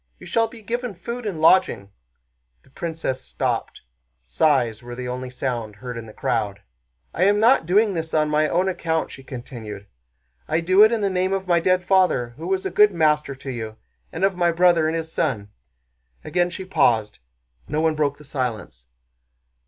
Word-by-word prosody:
You -, -, -13 dB
shall 225 Hz, -1 st, +1 dB
be 225 Hz, -1 st, -13 dB
given 240 Hz, -1 st, -3 dB
food 235 Hz, +6 st, -6 dB
and 180 Hz, -6 st, -4 dB
lodging." 120 Hz, -, +3 dB, 0.7 s
The -, -, -25 dB
princess 160 Hz, -5 st, -4 dB
stopped. -, -, -3 dB, 0.4 s
Sighs 120 Hz, -, +1 dB
were 120 Hz, 0 st, -8 dB
the 125 Hz, 0 st, -5 dB
only 125 Hz, +1 st, -4 dB
sound 120 Hz, -4 st, -4 dB
heard 125 Hz, +4 st, -7 dB
in 115 Hz, -1 st, -7 dB
the -, -, -10 dB
crowd. 100 Hz, -1 st, -2 dB, 0.5 s
"I 180 Hz, -, +2 dB
am 205 Hz, +1 st, +4 dB
not 225 Hz, -6 st, +4 dB
doing 205 Hz, +3 st, +3 dB
this 160 Hz, -2 st, -4 dB
on 155 Hz, -1 st, +2 dB
my 150 Hz, 0 st, +2 dB
own 180 Hz, +2 st, +1 dB
account," 165 Hz, -3 st, -1 dB
she 135 Hz, -, -10 dB
continued, 115 Hz, -6 st, -8 dB, 0.6 s
"I -, -, +1 dB
do 185 Hz, +4 st, +4 dB
it 220 Hz, -, +6 dB
in 230 Hz, -2 st, 0 dB
the 200 Hz, -, +1 dB
name 185 Hz, +1 st, 0 dB
of 190 Hz, -1 st, -2 dB
my 175 Hz, -2 st, +3 dB
dead 185 Hz, +1 st, +2 dB
father, 180 Hz, -10 st, +2 dB
who 155 Hz, +8 st, -9 dB
was 190 Hz, 0 st, -1 dB
a -, -, -2 dB
good 210 Hz, 0 st, +5 dB
master 150 Hz, -4 st, +1 dB
to 135 Hz, 0 st, -7 dB
you, 110 Hz, -3 st, -6 dB, 0.3 s
and -, -, 0 dB
of 195 Hz, -1 st, +1 dB
my 175 Hz, -1 st, +2 dB
brother 170 Hz, -2 st, +4 dB
and 160 Hz, -, -1 dB
his 160 Hz, -1 st, -4 dB
son." 110 Hz, -10 st, -1 dB, 0.7 s
Again 175 Hz, 0 st, 0 dB
she 185 Hz, +2 st, -7 dB
paused. 110 Hz, -, +1 dB, 0.5 s
No 150 Hz, -, -1 dB
one 160 Hz, 0 st, +2 dB
broke 145 Hz, -2 st, 0 dB
the 150 Hz, -, -15 dB
silence. 115 Hz, -, -4 dB
160 Hz, 190 wpm, -23 LUFS, 125-185 Hz, 0.7 s, it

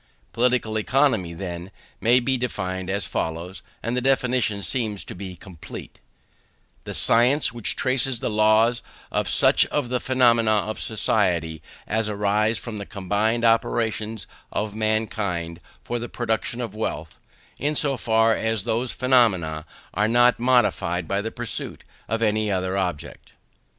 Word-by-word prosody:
Political 120 Hz, -2 st, +1 dB
Economy, 110 Hz, -8 st, +1 dB
then, 90 Hz, 0 st, -6 dB, 0.3 s
may 120 Hz, +3 st, +4 dB
be 130 Hz, +2 st, 0 dB
defined 95 Hz, -7 st, -3 dB
as 100 Hz, +1 st, +3 dB
follows; 85 Hz, +4 st, -4 dB, 0.2 s
and 115 Hz, +2 st, -2 dB
the 125 Hz, -, 0 dB
definition 125 Hz, -5 st, +1 dB
seems 110 Hz, -6 st, -1 dB
to -, -, -8 dB
be 95 Hz, 0 st, -8 dB
complete: 85 Hz, -4 st, -11 dB, 0.9 s
"The -, -, -4 dB
science 125 Hz, +3 st, +3 dB
which 120 Hz, -3 st, -1 dB
traces 130 Hz, -1 st, +1 dB
the -, -, -2 dB
laws 110 Hz, +2 st, +3 dB, 0.3 s
of -, -, -1 dB
such -, -, +4 dB
of 145 Hz, -5 st, -2 dB
the 125 Hz, 0 st, 0 dB
phenomena 120 Hz, -4 st, +3 dB
of 110 Hz, +1 st, -1 dB
society 90 Hz, -7 st, 0 dB, 0.2 s
as 110 Hz, 0 st, -1 dB
arise 105 Hz, +2 st, +1 dB
from 105 Hz, +3 st, -6 dB
the 100 Hz, -, -6 dB
combined 105 Hz, +4 st, 0 dB
operations 110 Hz, -2 st, 0 dB, 0.3 s
of 105 Hz, 0 st, -3 dB
mankind 105 Hz, -6 st, -2 dB, 0.2 s
for 120 Hz, -, -3 dB
the 120 Hz, -, -6 dB
production 120 Hz, +1 st, -2 dB
of 115 Hz, -5 st, -5 dB
wealth, 110 Hz, +1 st, -4 dB, 0.4 s
in 150 Hz, +3 st, -1 dB
so 140 Hz, -2 st, +2 dB
far 115 Hz, -2 st, +2 dB
as 110 Hz, -3 st, -1 dB
those 120 Hz, +4 st, 0 dB
phenomena 95 Hz, -12 st, +2 dB, 0.3 s
are 105 Hz, +3 st, +1 dB
not 120 Hz, +2 st, +4 dB
modified 105 Hz, -9 st, +1 dB
by 100 Hz, +3 st, 0 dB
the 110 Hz, +2 st, -4 dB
pursuit 120 Hz, -1 st, -4 dB, 0.3 s
of 115 Hz, +1 st, -1 dB
any 110 Hz, 0 st, +1 dB
other 95 Hz, -1 st, -1 dB
object." 90 Hz, -6 st, -4 dB
110 Hz, 145 wpm, -23 LUFS, 100-120 Hz, 0.9 s, may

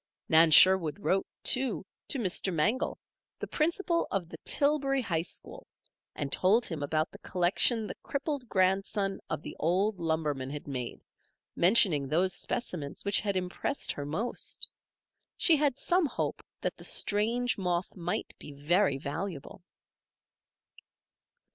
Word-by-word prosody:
Nan 160 Hz, 0 st, +6 dB
Sherwood 175 Hz, 0 st, +6 dB
wrote, 195 Hz, -1 st, 0 dB, 0.2 s
too, 255 Hz, -7 st, +2 dB, 0.2 s
to -, -, -1 dB
Mr. 190 Hz, -4 st, 0 dB
Mangel, 200 Hz, -, 0 dB, 0.4 s
the -, -, -5 dB
principal 335 Hz, +2 st, 0 dB
of 180 Hz, -4 st, -3 dB
the -, -, -10 dB
Tillbury 280 Hz, -2 st, +1 dB
High 165 Hz, -7 st, 0 dB
School, 170 Hz, -, -7 dB, 0.5 s
and 140 Hz, -2 st, -4 dB
told 210 Hz, +9 st, +3 dB
him 165 Hz, -5 st, -4 dB
about 155 Hz, +3 st, -1 dB
the -, -, -13 dB
collection 195 Hz, +6 st, +2 dB
the -, -, -5 dB
crippled 280 Hz, -3 st, -4 dB
grandson 195 Hz, +1 st, 0 dB
of -, -, -4 dB
the -, -, -8 dB
old 185 Hz, +5 st, +1 dB
lumberman 155 Hz, -5 st, -2 dB
had 145 Hz, +1 st, -7 dB
made, 125 Hz, -4 st, -5 dB, 0.5 s
mentioning 175 Hz, -7 st, +5 dB
those 175 Hz, +6 st, +1 dB
specimens 175 Hz, -5 st, -5 dB
which 200 Hz, 0 st, +3 dB
had 200 Hz, -3 st, -1 dB
impressed 185 Hz, +9 st, -2 dB
her 145 Hz, -, -5 dB
most. 205 Hz, +12 st, -3 dB, 0.7 s
She 335 Hz, -, +5 dB
had 285 Hz, -3 st, +1 dB
some 350 Hz, 0 st, +2 dB
hope -, -, -3 dB, 0.2 s
that -, -, -3 dB
the -, -, -13 dB
strange 230 Hz, +3 st, +1 dB
moth 180 Hz, -1 st, -2 dB
might 175 Hz, -1 st, -4 dB
be 145 Hz, -, -10 dB
very 155 Hz, +3 st, +1 dB
valuable. 160 Hz, +4 st, -6 dB
185 Hz, 135 wpm, -29 LUFS, 160-235 Hz, 0.7 s, Nan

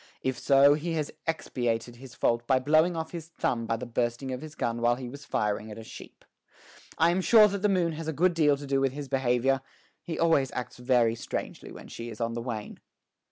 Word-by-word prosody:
If 130 Hz, -1 st, -1 dB
so, 140 Hz, +2 st, +6 dB
he 160 Hz, +3 st, -2 dB
has 155 Hz, -2 st, -2 dB, 0.2 s
expiated 120 Hz, -7 st, -2 dB
his 130 Hz, -1 st, -12 dB
fault 120 Hz, 0 st, 0 dB
by 130 Hz, -, +4 dB
blowing 155 Hz, +6 st, +3 dB
off 160 Hz, -1 st, -4 dB
his 165 Hz, -2 st, -7 dB
thumb 120 Hz, -8 st, -2 dB
by 115 Hz, -, 0 dB
the 125 Hz, -, -6 dB
bursting 120 Hz, +2 st, -2 dB
of 125 Hz, -, -5 dB
his 155 Hz, -1 st, -9 dB
gun 115 Hz, -3 st, -2 dB
while 120 Hz, 0 st, +3 dB
he 125 Hz, 0 st, -7 dB
was 140 Hz, +3 st, -10 dB
firing 105 Hz, +1 st, -1 dB
at 105 Hz, -, -8 dB
a 115 Hz, -, -8 dB
sheep. -, -, -12 dB, 0.7 s
I 165 Hz, +1 st, +4 dB
am 185 Hz, +2 st, +1 dB
sure 215 Hz, +2 st, +7 dB
that 200 Hz, -1 st, -3 dB
the 210 Hz, -, +3 dB
moon 180 Hz, -4 st, +2 dB
has 160 Hz, 0 st, -6 dB
a -, -, 0 dB
good 175 Hz, +4 st, +2 dB
deal 150 Hz, -4 st, +3 dB
to 145 Hz, -, -8 dB
do 135 Hz, 0 st, +1 dB
with 135 Hz, -1 st, +1 dB
his 145 Hz, 0 st, -6 dB
behavior; 130 Hz, 0 st, +1 dB, 0.4 s
he 165 Hz, -, -5 dB
always 160 Hz, -6 st, +2 dB
acts 125 Hz, -1 st, -5 dB
very 125 Hz, -2 st, +2 dB
strangely 115 Hz, -, -6 dB
when -, -, -11 dB
she 115 Hz, 0 st, -7 dB
is 110 Hz, -, -9 dB
on 115 Hz, 0 st, -1 dB
the 115 Hz, -, -3 dB
wane." 115 Hz, -3 st, -6 dB
135 Hz, 230 wpm, -28 LUFS, 120-160 Hz, 0.7 s, sure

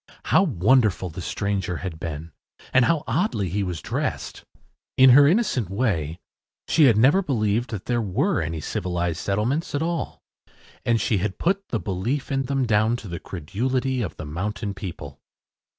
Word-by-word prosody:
How -, -, +4 dB
wonderful 110 Hz, -, +2 dB
the 90 Hz, +4 st, -7 dB
stranger 95 Hz, -2 st, -2 dB
had 80 Hz, -2 st, -6 dB
been 80 Hz, 0 st, -6 dB, 0.4 s
and 130 Hz, -2 st, +5 dB
how 165 Hz, 0 st, +1 dB
oddly 110 Hz, -, 0 dB
he 100 Hz, +5 st, -1 dB
was 90 Hz, -4 st, -4 dB
dressed! -, -, -3 dB, 0.5 s
In 130 Hz, 0 st, +8 dB
her 140 Hz, +3 st, +8 dB
innocent 160 Hz, -, +1 dB
way 95 Hz, -, -1 dB, 0.5 s
she 160 Hz, -, +5 dB
had 115 Hz, -6 st, +5 dB
never 135 Hz, -, +5 dB
believed 120 Hz, -, 0 dB
that 105 Hz, -1 st, -6 dB
there 120 Hz, -1 st, 0 dB
were 135 Hz, -, 0 dB
any 80 Hz, 0 st, -3 dB
civilized 85 Hz, 0 st, -2 dB
settlements 110 Hz, -, -1 dB
at 145 Hz, -, 0 dB
all, 170 Hz, 0 st, -3 dB, 0.6 s
and 115 Hz, -2 st, +2 dB
she 105 Hz, -1 st, +1 dB
had 95 Hz, +1 st, -2 dB
put 195 Hz, +3 st, 0 dB
the 115 Hz, -, -2 dB
belief 105 Hz, +11 st, -3 dB
in 135 Hz, 0 st, 0 dB
them 135 Hz, 0 st, 0 dB
down 110 Hz, +1 st, +2 dB
to 115 Hz, -4 st, -8 dB
the 85 Hz, -1 st, -5 dB
credulity 125 Hz, -, -2 dB
of 90 Hz, -9 st, -4 dB
the 80 Hz, -, -6 dB
mountain 100 Hz, +7 st, -3 dB
people. 85 Hz, -7 st, -8 dB
105 Hz, 165 wpm, -24 LUFS, 90-130 Hz, 0.6 s, In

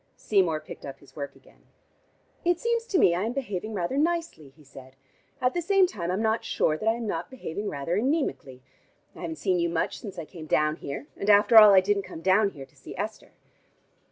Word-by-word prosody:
Seymour 180 Hz, -7 st, +1 dB
picked 155 Hz, -, -11 dB
up 135 Hz, -1 st, -8 dB
his 135 Hz, -2 st, -21 dB
work 140 Hz, -1 st, -6 dB
again. -, -, -22 dB, 0.8 s
"It 350 Hz, 0 st, +2 dB
seems 465 Hz, +1 st, -1 dB
to 390 Hz, -, +1 dB
me 175 Hz, -, +5 dB
I 175 Hz, +3 st, -1 dB
am 230 Hz, -, -2 dB
behaving 215 Hz, -5 st, -4 dB
rather 195 Hz, +9 st, -1 dB
nicely," 330 Hz, -, -1 dB
he 155 Hz, -, -18 dB
said. 130 Hz, -1 st, -14 dB, 0.4 s
"At 250 Hz, 0 st, +1 dB
the 350 Hz, -, -1 dB
same 390 Hz, +2 st, +4 dB
time 175 Hz, -, -5 dB
I'm 190 Hz, +5 st, -1 dB
not 220 Hz, +1 st, +1 dB
sure 155 Hz, -, +1 dB
that 215 Hz, +8 st, 0 dB
I 225 Hz, -, +2 dB
am 235 Hz, -1 st, -5 dB
not 210 Hz, -, -3 dB
behaving 210 Hz, -5 st, -5 dB
rather 145 Hz, +5 st, -3 dB
anemically. 215 Hz, -, -2 dB, 0.5 s
I -, -, -11 dB
haven't 165 Hz, -2 st, -4 dB
seen 180 Hz, +4 st, 0 dB
you 170 Hz, 0 st, +1 dB
much 165 Hz, -1 st, -2 dB
since 200 Hz, -4 st, -9 dB
I 165 Hz, -, -5 dB
came 160 Hz, -1 st, -11 dB
down 150 Hz, +1 st, +1 dB
here. 140 Hz, -3 st, -6 dB
And 200 Hz, -, -2 dB
after 205 Hz, +3 st, +5 dB
all 215 Hz, -2 st, +11 dB
I 190 Hz, -, +7 dB
didn't 200 Hz, +1 st, +1 dB
come 165 Hz, -, -10 dB
down 195 Hz, +3 st, +3 dB
here 140 Hz, -8 st, -10 dB
to 135 Hz, -, -30 dB
see -, -, -11 dB
Esther." -, -, -6 dB
190 Hz, 220 wpm, -26 LUFS, 155-235 Hz, 0.8 s, all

